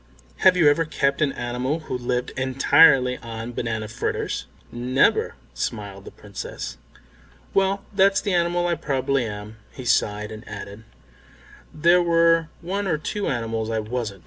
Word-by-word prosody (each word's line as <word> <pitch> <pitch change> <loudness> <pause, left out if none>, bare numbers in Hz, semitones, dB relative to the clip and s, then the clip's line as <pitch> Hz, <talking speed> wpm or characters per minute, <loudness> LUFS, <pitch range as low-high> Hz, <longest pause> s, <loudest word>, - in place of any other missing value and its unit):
Have 185 -1 +5
you 165 -4 +5
ever 145 +3 +4
kept 140 -3 0
any 145 -3 +1
animal 125 +6 -2
who 140 - -5
lived 125 0 -2
entirely 130 0 +4
on 115 0 -6
banana 110 -2 -3
fritters?" 115 +2 -3 0.2
"Never," 125 +3 +1 0.2
smiled 100 - -5
the - - -8
Princess. 100 -10 -7 0.8
"Well, 195 0 +1
that's 195 0 +4
the 200 - -2
animal 175 0 +1
I 175 - +1
probably 135 -4 0
am." 105 +1 -8
He 130 - -9
sighed 105 -2 +1
and 110 0 -9
added, 105 +3 -8 0.9
"There 170 +3 +4
were 165 -1 +3
one 195 +3 -2
or 160 - +1
two 205 +7 -3
animals 115 -2 -2
I 115 - -1
wasn't." 110 -2 -4
130 Hz, 145 wpm, -23 LUFS, 110-165 Hz, 0.9 s, Have